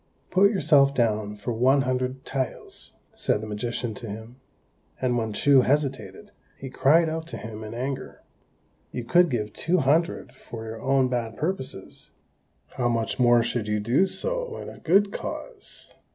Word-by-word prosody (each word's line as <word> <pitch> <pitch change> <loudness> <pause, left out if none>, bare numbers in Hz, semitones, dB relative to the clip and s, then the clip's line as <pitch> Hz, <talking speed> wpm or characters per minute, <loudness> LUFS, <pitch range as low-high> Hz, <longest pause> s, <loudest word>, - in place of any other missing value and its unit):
"Put 195 +2 +5
yourself 145 -8 +4
down 110 -4 0
for 105 +4 -4
one 130 +4 +3
hundred 130 +1 -2
taels," 135 -1 -4 0.2
said - - 0
the 110 - -6
magician 110 +2 -3
to 110 +2 -8
him; 110 +4 -8 0.6
and 125 -2 +1
when 110 -2 -1
Chou 135 +5 +5
hesitated, 130 -8 -1 0.3
he 135 -1 -8
cried 160 +6 +4
out 160 +1 -3
to - - -5
him 110 0 -7
in 110 +1 -7
anger, 130 +2 -5 0.7
"You 125 - -4
could 175 +7 +4
give 110 -5 -2
two 175 +3 +1
hundred 155 -2 +1
for 115 -3 -9
your 110 0 -7
own 135 -1 +3
bad 120 -3 -3
purposes: 150 - -4 0.7
how 120 -1 +1
much 115 +2 -1
more 120 -1 +5
should 115 -2 -2
you 105 0 0
do 120 - +3
so - - -2
in - - -7
a - - -12
good 200 +4 +3
cause?" 480 -5 -7
130 Hz, 165 wpm, -25 LUFS, 115-150 Hz, 0.7 s, Put